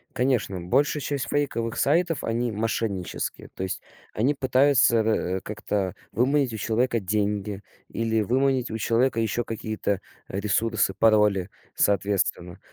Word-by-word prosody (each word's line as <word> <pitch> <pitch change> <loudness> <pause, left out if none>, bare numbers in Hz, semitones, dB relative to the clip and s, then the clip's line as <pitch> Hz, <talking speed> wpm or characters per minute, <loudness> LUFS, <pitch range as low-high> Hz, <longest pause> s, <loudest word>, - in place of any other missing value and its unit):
Конечно, 125 -7 0
большая 140 - +1
часть 140 -2 -2
фейковых 115 -6 -1
сайтов- 165 +2 +2
они 115 +1 -1
мошеннические. 105 -3 -3
То 95 - -4
есть 95 - -3 0.3
они 130 +7 +2
пытаются, 130 -2 +4
э, 110 -4 +1
как-то 100 -2 -3 0.2
выманить 130 0 +2
у - - -4
человека 115 +2 +1
деньги 100 0 -1 0.3
или 115 -1 -1
выманить 130 +2 +1
у 110 - -2
человека 115 +1 +1
еще 115 +2 -1
какие-то 110 -3 -2 0.3
ресурсы, 105 +1 0
пароли, 105 -4 +3 0.3
соответственно. 95 -2 0
110 Hz, 125 wpm, -25 LUFS, 100-125 Hz, 0.3 s, пытаются